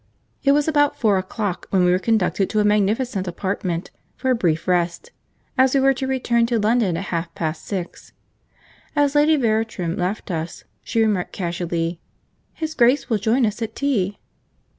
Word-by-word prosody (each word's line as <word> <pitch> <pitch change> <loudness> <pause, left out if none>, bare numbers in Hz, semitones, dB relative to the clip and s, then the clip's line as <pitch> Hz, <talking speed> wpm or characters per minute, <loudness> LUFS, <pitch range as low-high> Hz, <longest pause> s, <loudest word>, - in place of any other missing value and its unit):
It 275 - +5
was 295 +1 +2
about 290 -2 +2
four 205 -5 +3
o'clock 190 0 -4
when 185 -2 +3
we 180 - +4
were 180 - +3
conducted 200 -2 +1
to 215 - 0
a - - +4
magnificent 210 0 +1
apartment 175 -1 -3 0.2
for 260 - -1
a - - +4
brief 165 -7 0
rest, 180 - 0 0.5
as 260 +1 +4
we - - +5
were 270 0 +4
to 265 0 -4
return 240 -3 +1
to 235 -1 +1
London 215 -4 +2
at 180 - -3
half 170 0 -2
past 160 -1 -3
six. 185 -4 -6 0.8
As 290 -1 +2
Lady 300 +2 +4
Veratrum 220 - 0
left 185 +2 -3
us, 165 0 -4 0.2
she 230 - 0
remarked 210 -5 0
casually, 170 -1 -2 0.5
'His 315 -1 -4
Grace 245 0 +3
will 220 - +2
join 230 +5 +2
us 210 +1 -3
at 225 -1 -4
tea.' 205 -9 0
210 Hz, 175 wpm, -22 LUFS, 180-255 Hz, 0.8 s, It